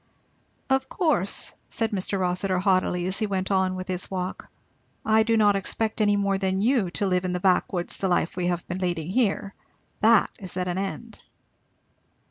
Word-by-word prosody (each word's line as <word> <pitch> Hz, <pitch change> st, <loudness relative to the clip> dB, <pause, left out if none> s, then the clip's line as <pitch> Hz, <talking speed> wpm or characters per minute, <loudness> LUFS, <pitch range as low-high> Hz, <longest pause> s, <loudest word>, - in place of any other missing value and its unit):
"Of 265 Hz, 0 st, +1 dB
course," 300 Hz, -, 0 dB, 0.2 s
said 225 Hz, 0 st, -1 dB
Mr. 195 Hz, 0 st, 0 dB
Rossitur 185 Hz, +1 st, 0 dB
haughtily 185 Hz, -1 st, +1 dB
as 190 Hz, +1 st, -1 dB
he 215 Hz, -, 0 dB
went 190 Hz, -1 st, -2 dB
on 190 Hz, -1 st, +1 dB
with 185 Hz, 0 st, -6 dB
his 185 Hz, -1 st, -1 dB
walk, 185 Hz, -1 st, -4 dB, 0.6 s
"I 220 Hz, 0 st, +4 dB
do 225 Hz, +1 st, +2 dB
not 205 Hz, -2 st, +4 dB
expect 220 Hz, +3 st, -1 dB
any 205 Hz, -1 st, +3 dB
more 200 Hz, -1 st, 0 dB
than 190 Hz, -1 st, 0 dB
you 225 Hz, -3 st, +2 dB
to 205 Hz, -, 0 dB
live 180 Hz, -1 st, +1 dB
in 180 Hz, -1 st, -2 dB
the 180 Hz, -, -1 dB
back 185 Hz, -1 st, +2 dB
woods 175 Hz, -2 st, -1 dB
the 195 Hz, -, 0 dB
life 175 Hz, -2 st, 0 dB
we 180 Hz, -1 st, -1 dB
have 175 Hz, -1 st, -2 dB
been 180 Hz, +1 st, -4 dB
leading 175 Hz, -2 st, -2 dB
here. 200 Hz, -3 st, 0 dB, 0.5 s
That 220 Hz, 0 st, +4 dB
is 185 Hz, -2 st, -5 dB
at 180 Hz, 0 st, -1 dB
an 180 Hz, +1 st, -2 dB
end." 220 Hz, +4 st, -5 dB
190 Hz, 190 wpm, -25 LUFS, 180-210 Hz, 0.6 s, I